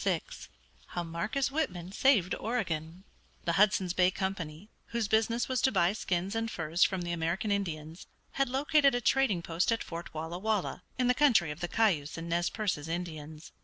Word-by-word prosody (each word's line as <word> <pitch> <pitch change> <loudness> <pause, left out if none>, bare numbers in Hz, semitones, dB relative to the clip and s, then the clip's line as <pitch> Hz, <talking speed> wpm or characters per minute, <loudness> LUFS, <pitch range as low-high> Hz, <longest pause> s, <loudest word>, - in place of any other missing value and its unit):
VI - - +2 0.7
HOW 175 - -3
MARCUS 210 +12 -1
WHITMAN 185 - -2
SAVED 205 -5 +3
OREGON 175 -7 -3 0.4
The 170 - +2
Hudson's 190 -1 +3
Bay 180 -1 +4
Company, 190 -1 -4 0.2
whose 235 -2 -1
business 225 +2 +1
was 255 -1 0
to 265 - +3
buy 175 -3 +3
skins 190 -2 -2
and 225 0 -1
furs 165 -2 +1
from 190 -2 +1
the 175 - -3
American 170 +6 -1
Indians, 165 -5 -3 0.2
had 275 -2 0
located 280 0 +3
a - - +1
trading 235 -10 +2
post 170 +6 0
at 230 - 0
Fort 170 0 -7
Walla 160 +3 -5
Walla, 210 -3 -1 0.2
in 250 - +1
the 250 - +4
country 240 - +4
of 150 - -7
the 175 - -2
Cayuse 175 -10 +1
and 165 +1 -5
Nez 175 +1 +1
Percés 190 -9 -2
Indians. 160 -2 -6
185 Hz, 180 wpm, -30 LUFS, 170-225 Hz, 0.7 s, Bay